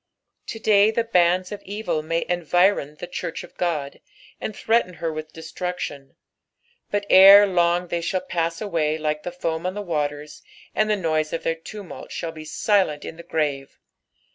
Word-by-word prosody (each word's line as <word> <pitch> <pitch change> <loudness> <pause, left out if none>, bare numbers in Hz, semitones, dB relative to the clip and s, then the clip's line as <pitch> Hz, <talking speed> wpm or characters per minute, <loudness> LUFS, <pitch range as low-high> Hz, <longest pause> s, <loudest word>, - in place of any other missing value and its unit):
To - - -5
day 210 -1 +4
the 230 +1 0
bands 180 -3 +2
of 205 - -6
evil 205 -5 -3
may 165 +2 -2
environ 175 -2 +1
the 165 - -7
church 170 - -5
of - - -14
Qod, 155 -6 -2 0.4
and 215 - -5
threaten 220 -6 +1
her 165 -2 -3
with 155 0 -7
destruction; 160 -4 -6 0.7
but 205 0 -1
ere 195 +2 +9
long 175 -2 +1
they 170 - -1
shall 185 +2 -1
pass 170 -2 -2
away 160 -7 0
like 150 -1 -2
the 175 - -5
foam 165 -2 -3
on 185 - -4
the 205 - -3
waters, 150 -3 -3 0.3
and 215 0 +1
the 210 - +3
noise 155 -5 -1
of 165 - -3
their 165 - +1
tumult 185 +4 -10
shall 165 - -4
be 155 -1 -10
silent 185 -2 +1
in - - -7
the - - -8
grave. 150 -5 -2
170 Hz, 175 wpm, -23 LUFS, 155-195 Hz, 0.7 s, ere